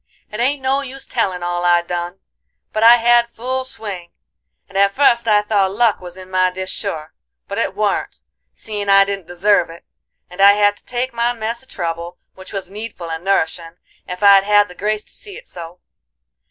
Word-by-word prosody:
"It 210 Hz, -, -6 dB
ain't 265 Hz, +3 st, 0 dB
no 270 Hz, +1 st, +1 dB
use 270 Hz, 0 st, -6 dB
tellin' 185 Hz, -7 st, -2 dB
all 175 Hz, 0 st, -2 dB
I 175 Hz, -1 st, +3 dB
done, 175 Hz, +2 st, -5 dB, 0.5 s
but 215 Hz, -, -1 dB
I 230 Hz, +2 st, +9 dB
had 240 Hz, 0 st, +3 dB
full 260 Hz, +3 st, -3 dB
swing, 200 Hz, -9 st, -7 dB, 0.6 s
and 195 Hz, -, -19 dB
at 200 Hz, 0 st, +4 dB
fust 235 Hz, 0 st, +2 dB
I 210 Hz, -1 st, +4 dB
thought 200 Hz, -2 st, +1 dB
luck 225 Hz, -1 st, +2 dB
was 180 Hz, 0 st, -9 dB
in 185 Hz, 0 st, -12 dB
my 185 Hz, 0 st, +3 dB
dish 185 Hz, +1 st, -6 dB
sure. 160 Hz, -6 st, -5 dB, 0.3 s
But -, -, -4 dB
it -, -, -1 dB
warn't, -, -, -2 dB, 0.3 s
seein' 205 Hz, -2 st, -6 dB
I 195 Hz, 0 st, +6 dB
didn't 195 Hz, -3 st, -5 dB
deserve 175 Hz, 0 st, +2 dB
it, 165 Hz, +1 st, -13 dB, 0.4 s
and 180 Hz, +2 st, -6 dB
I 200 Hz, +1 st, +8 dB
had 205 Hz, 0 st, +3 dB
to -, -, -20 dB
take 250 Hz, +1 st, -3 dB
my 235 Hz, +1 st, 0 dB
mess 230 Hz, 0 st, -4 dB
of 265 Hz, -, -21 dB
trouble, 170 Hz, 0 st, -5 dB, 0.2 s
which 190 Hz, 0 st, -13 dB
was 195 Hz, -2 st, -6 dB
needful 205 Hz, -5 st, -7 dB
and 160 Hz, +1 st, -5 dB
nourishin', 170 Hz, -3 st, -1 dB, 0.3 s
ef 180 Hz, +2 st, -6 dB
I'd 200 Hz, -1 st, +7 dB
had 205 Hz, 0 st, +3 dB
the -, -, -11 dB
grace 210 Hz, +3 st, -2 dB
to -, -, -17 dB
see 410 Hz, -2 st, -10 dB
it -, -, -14 dB
so. 170 Hz, 0 st, -10 dB
200 Hz, 200 wpm, -18 LUFS, 180-230 Hz, 0.6 s, I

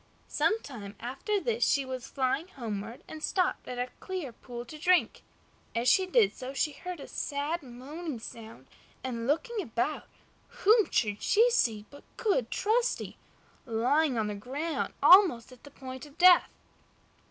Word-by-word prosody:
Some 440 Hz, -, +1 dB
time 210 Hz, -7 st, -9 dB
after 275 Hz, -, -2 dB
this 465 Hz, +3 st, -1 dB
she 275 Hz, -2 st, +2 dB
was 255 Hz, -2 st, -6 dB
flying 270 Hz, +5 st, -1 dB
homeward 225 Hz, -, -6 dB
and 315 Hz, -, -9 dB
stopped 365 Hz, -2 st, 0 dB
at 250 Hz, -, -5 dB
a 250 Hz, +1 st, -3 dB
clear 365 Hz, -9 st, -5 dB
pool 240 Hz, +1 st, -9 dB
to 305 Hz, +5 st, -10 dB
drink. 360 Hz, +2 st, +2 dB, 0.5 s
As 235 Hz, +2 st, 0 dB
she 375 Hz, +9 st, +4 dB
did 430 Hz, +1 st, +4 dB
so 260 Hz, +2 st, -7 dB
she 300 Hz, -, +1 dB
heard 355 Hz, +4 st, -7 dB
a 275 Hz, -, -8 dB
sad, 290 Hz, +4 st, -3 dB
moaning 280 Hz, +4 st, -7 dB
sound, 225 Hz, 0 st, -10 dB, 0.4 s
and 235 Hz, -2 st, -4 dB
looking 420 Hz, -, 0 dB
about, 235 Hz, -, -2 dB, 0.4 s
whom 430 Hz, +1 st, +3 dB
should 210 Hz, -3 st, 0 dB
she 470 Hz, +3 st, +4 dB
see 220 Hz, -, +1 dB
but 285 Hz, -, -13 dB
good 375 Hz, -, +1 dB
Trusty, 465 Hz, +4 st, 0 dB, 0.5 s
lying 255 Hz, +5 st, +2 dB
on 220 Hz, -, +1 dB
the 210 Hz, -, -3 dB
ground, 275 Hz, +10 st, -3 dB
almost 355 Hz, -, +7 dB
at 255 Hz, -, -16 dB
the -, -, -11 dB
point 260 Hz, 0 st, -9 dB
of 290 Hz, +2 st, -19 dB
death. 360 Hz, 0 st, +7 dB
280 Hz, 160 wpm, -29 LUFS, 240-360 Hz, 0.5 s, almost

